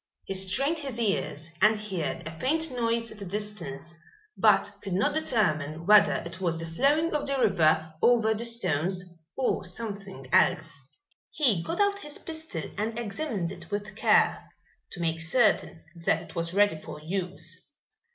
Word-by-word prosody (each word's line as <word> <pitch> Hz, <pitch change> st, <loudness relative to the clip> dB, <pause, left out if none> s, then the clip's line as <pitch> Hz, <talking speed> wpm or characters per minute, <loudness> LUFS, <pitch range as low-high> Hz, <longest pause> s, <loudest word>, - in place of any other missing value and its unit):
He -, -, -4 dB
strained 255 Hz, -, +1 dB
his 270 Hz, -5 st, -3 dB
ears, 170 Hz, -7 st, -1 dB
and 215 Hz, +2 st, +5 dB
heard 195 Hz, -10 st, -4 dB
a 160 Hz, -, -6 dB
faint 320 Hz, +3 st, +1 dB
noise 230 Hz, -2 st, -1 dB
at 215 Hz, -, -11 dB
a -, -, -5 dB
distance 175 Hz, -5 st, -4 dB, 0.3 s
but -, -, +4 dB
could 195 Hz, -3 st, -4 dB
not 190 Hz, +3 st, +2 dB
determine 165 Hz, -, 0 dB
whether 205 Hz, 0 st, +6 dB
it 170 Hz, +2 st, -8 dB
was 170 Hz, -3 st, 0 dB
the 165 Hz, -, -4 dB
flowing 280 Hz, -, +2 dB
of 300 Hz, -1 st, -1 dB
the 275 Hz, 0 st, 0 dB
river 160 Hz, -8 st, +3 dB
over 225 Hz, -2 st, +4 dB
the 220 Hz, +2 st, -2 dB
stones 185 Hz, -6 st, +1 dB, 0.3 s
or 265 Hz, -, 0 dB
something 195 Hz, -, -5 dB
else. 155 Hz, -1 st, +3 dB, 0.5 s
He 235 Hz, -, +2 dB
got 330 Hz, -, -4 dB
out 405 Hz, 0 st, +2 dB
his 295 Hz, -6 st, -5 dB
pistol 315 Hz, -, -6 dB, 0.2 s
and 220 Hz, +2 st, -2 dB
examined 210 Hz, -, -3 dB
it -, -, -10 dB
with 205 Hz, 0 st, -4 dB
care, -, -, +3 dB, 0.4 s
to 175 Hz, -, -8 dB
make 165 Hz, -1 st, -1 dB
certain 175 Hz, -2 st, +2 dB, 0.2 s
that -, -, +3 dB
it -, -, -12 dB
was 170 Hz, 0 st, -2 dB
ready 205 Hz, -3 st, +3 dB
for 155 Hz, -1 st, -9 dB
use. 170 Hz, 0 st, -4 dB
200 Hz, 160 wpm, -28 LUFS, 170-235 Hz, 0.5 s, whether